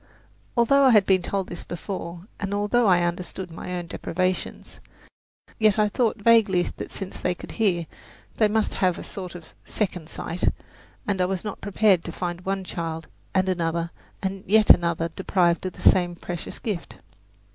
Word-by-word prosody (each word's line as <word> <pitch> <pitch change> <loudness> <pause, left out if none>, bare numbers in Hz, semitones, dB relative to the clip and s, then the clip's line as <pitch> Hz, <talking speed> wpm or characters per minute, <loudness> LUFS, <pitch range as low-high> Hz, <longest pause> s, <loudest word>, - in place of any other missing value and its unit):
Although 275 +4 +5
I - - +7
had 210 -5 +6
been 190 -1 +4
told 195 +1 -2
this 175 - -7
before, 175 -1 -6
and 200 0 -2
although 210 +3 +2
I 175 -2 +5
understood 175 +1 -3
my 180 +2 -5
own 175 -1 -4
deprivations, 185 +2 -3 0.8
yet 215 -2 +4
I 215 - +5
had 210 - -1
thought 230 -3 +1
vaguely 205 -4 +4
that - - -7
since 195 -2 -7
they 180 - 0
could - - -10
hear, 185 -7 +1 0.5
they 215 - +5
must 215 +1 0
have 180 -2 +1
a - - -7
sort 180 -2 -7
of 170 -2 -11
"second 180 -6 -3
sight," 170 +1 -3 0.6
and 195 -2 0
I - - +4
was 185 -1 -2
not 210 -2 -6
prepared 200 -3 +3
to 170 - -4
find 175 +1 -4
one 195 +1 -2
child 165 -3 -4 0.3
and 190 0 +3
another 170 -2 -1 0.3
and 190 0 -3
yet 215 +2 +6
another 170 -1 +3
deprived 180 -1 +1
of 185 - -6
the - - -13
same 175 -2 +4
precious 175 0 -6
gift. 205 -7 -4
185 Hz, 180 wpm, -25 LUFS, 175-205 Hz, 0.8 s, I